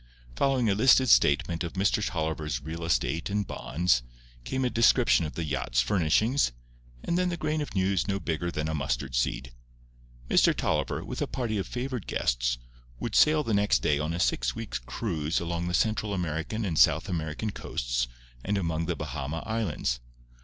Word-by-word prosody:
Following 135 Hz, -4 st, +2 dB
a 100 Hz, -, +3 dB
listed 130 Hz, +4 st, +5 dB
statement 80 Hz, +2 st, +4 dB
of 85 Hz, -, -5 dB
Mr. 100 Hz, +2 st, +1 dB
Tolliver's 80 Hz, -7 st, -2 dB
real 80 Hz, +5 st, -6 dB
estate 80 Hz, +2 st, 0 dB
and 100 Hz, 0 st, 0 dB
bonds, 75 Hz, -7 st, 0 dB, 0.4 s
came 130 Hz, -, -1 dB
a -, -, +2 dB
description 115 Hz, -5 st, +4 dB
of -, -, -10 dB
the 85 Hz, -, -2 dB
yacht's 65 Hz, -5 st, -1 dB
furnishings, 95 Hz, -, +2 dB, 0.5 s
and 170 Hz, -, 0 dB
then 180 Hz, 0 st, +1 dB
the 175 Hz, -, -3 dB
grain 155 Hz, -1 st, -1 dB
of 145 Hz, -, -6 dB
news 95 Hz, 0 st, +1 dB
no 100 Hz, -1 st, 0 dB
bigger 85 Hz, -1 st, -2 dB
than 75 Hz, -2 st, -2 dB
a 80 Hz, -, -2 dB
mustard 65 Hz, -2 st, -2 dB
seed. 60 Hz, +1 st, -1 dB, 0.8 s
Mr. -, -, +4 dB
Tolliver, -, -, -1 dB
with -, -, -5 dB
a -, -, 0 dB
party 115 Hz, -5 st, -2 dB
of 95 Hz, -, -3 dB
favoured 125 Hz, -3 st, -4 dB
guests, -, -, 0 dB, 0.4 s
would 115 Hz, -, -3 dB
sail 155 Hz, 0 st, +5 dB
the 115 Hz, -, -1 dB
next 100 Hz, -12 st, +2 dB
day 75 Hz, -1 st, +2 dB
on 75 Hz, +2 st, -2 dB
a 85 Hz, -, -3 dB
six -, -, +1 dB
weeks' 65 Hz, +1 st, -4 dB
cruise 80 Hz, -, -2 dB
along 85 Hz, 0 st, -3 dB
the 90 Hz, -, -2 dB
Central 110 Hz, +1 st, 0 dB
American 90 Hz, +5 st, -2 dB
and 80 Hz, -6 st, 0 dB
South -, -, +4 dB
American 85 Hz, +3 st, -3 dB
coasts -, -, -2 dB, 0.4 s
and 100 Hz, +1 st, 0 dB
among 85 Hz, -3 st, -1 dB
the 85 Hz, -, -1 dB
Bahama 75 Hz, +2 st, -4 dB
Islands. 110 Hz, -, -1 dB
85 Hz, 180 wpm, -28 LUFS, 75-110 Hz, 0.8 s, listed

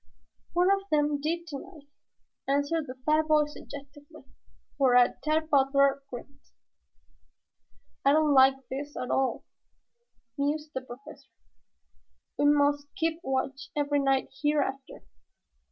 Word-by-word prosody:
"One 355 Hz, +2 st, +3 dB
of 395 Hz, 0 st, +2 dB
them 295 Hz, -1 st, +1 dB
did 335 Hz, +3 st, -2 dB
tonight," 310 Hz, 0 st, -10 dB, 0.6 s
answered 285 Hz, +3 st, 0 dB
the 255 Hz, -, -7 dB
fat 310 Hz, 0 st, +2 dB
boy 305 Hz, -1 st, +4 dB
suggestively, 290 Hz, -1 st, -12 dB, 0.6 s
whereat 250 Hz, -2 st, +4 dB
Tad 310 Hz, +1 st, 0 dB
Butler 275 Hz, 0 st, +3 dB
grinned. 275 Hz, +3 st, -10 dB, 1.6 s
"I 275 Hz, -, +5 dB
don't 305 Hz, -1 st, +3 dB
like 265 Hz, -1 st, +4 dB
this 285 Hz, +2 st, -6 dB
at 250 Hz, -, -4 dB
all," 265 Hz, -1 st, 0 dB, 1.0 s
mused 300 Hz, +2 st, -1 dB
the 260 Hz, -, -3 dB
Professor. 255 Hz, +1 st, -13 dB, 1.1 s
"We 290 Hz, -, +3 dB
must 290 Hz, 0 st, +3 dB
keep 325 Hz, -3 st, -1 dB
watch 270 Hz, 0 st, -3 dB
every 290 Hz, 0 st, +1 dB
night 270 Hz, -1 st, 0 dB
hereafter. 285 Hz, -2 st, -1 dB
285 Hz, 115 wpm, -28 LUFS, 270-305 Hz, 1.6 s, I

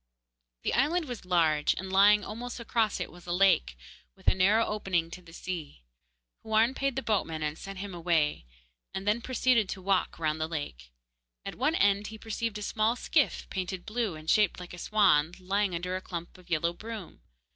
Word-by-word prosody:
The -, -, 0 dB
island 315 Hz, +6 st, +2 dB
was 245 Hz, -7 st, -7 dB
large, 160 Hz, -4 st, +2 dB
and 190 Hz, +1 st, -6 dB
lying 205 Hz, +2 st, +6 dB
almost 240 Hz, +3 st, -6 dB
across 225 Hz, -2 st, 0 dB
it -, -, -4 dB
was 175 Hz, 0 st, -15 dB
a -, -, -3 dB
lake, 175 Hz, -, +3 dB, 0.4 s
with -, -, -22 dB
a -, -, +6 dB
narrow 200 Hz, +5 st, +4 dB
opening 180 Hz, -6 st, -1 dB
to 180 Hz, -, -8 dB
the 170 Hz, -2 st, -15 dB
sea. 165 Hz, -, -6 dB, 0.6 s
Houarn 220 Hz, +3 st, +3 dB
paid 275 Hz, -1 st, -1 dB
the 270 Hz, -, -2 dB
boatman 165 Hz, -7 st, -1 dB
and 150 Hz, 0 st, -2 dB
sent 195 Hz, +3 st, -8 dB
him 195 Hz, 0 st, -6 dB
away, 165 Hz, -, 0 dB, 0.5 s
and 190 Hz, +1 st, -4 dB
then 215 Hz, +3 st, +2 dB
proceeded 250 Hz, -4 st, +2 dB
to -, -, -4 dB
walk 195 Hz, -1 st, +1 dB
round 155 Hz, -1 st, -1 dB
the 155 Hz, -, 0 dB
lake. 65 Hz, -, -6 dB, 0.5 s
At -, -, -4 dB
one 295 Hz, +6 st, +1 dB
end 200 Hz, -3 st, +3 dB
he 220 Hz, -, -8 dB
perceived 225 Hz, 0 st, -3 dB
a 210 Hz, -, -6 dB
small 220 Hz, +3 st, +1 dB
skiff, 290 Hz, +3 st, +1 dB
painted 185 Hz, -1 st, -4 dB
blue 225 Hz, -5 st, -2 dB
and 155 Hz, 0 st, -11 dB
shaped 210 Hz, 0 st, +3 dB
like 180 Hz, -1 st, -9 dB
a 175 Hz, -, -8 dB
swan, 175 Hz, -7 st, +3 dB
lying 195 Hz, 0 st, 0 dB
under 180 Hz, +2 st, -3 dB
a 185 Hz, -, -3 dB
clump 170 Hz, -2 st, -7 dB
of 180 Hz, 0 st, -19 dB
yellow 170 Hz, 0 st, +1 dB
broom. 220 Hz, 0 st, -8 dB
190 Hz, 195 wpm, -29 LUFS, 170-220 Hz, 0.6 s, lying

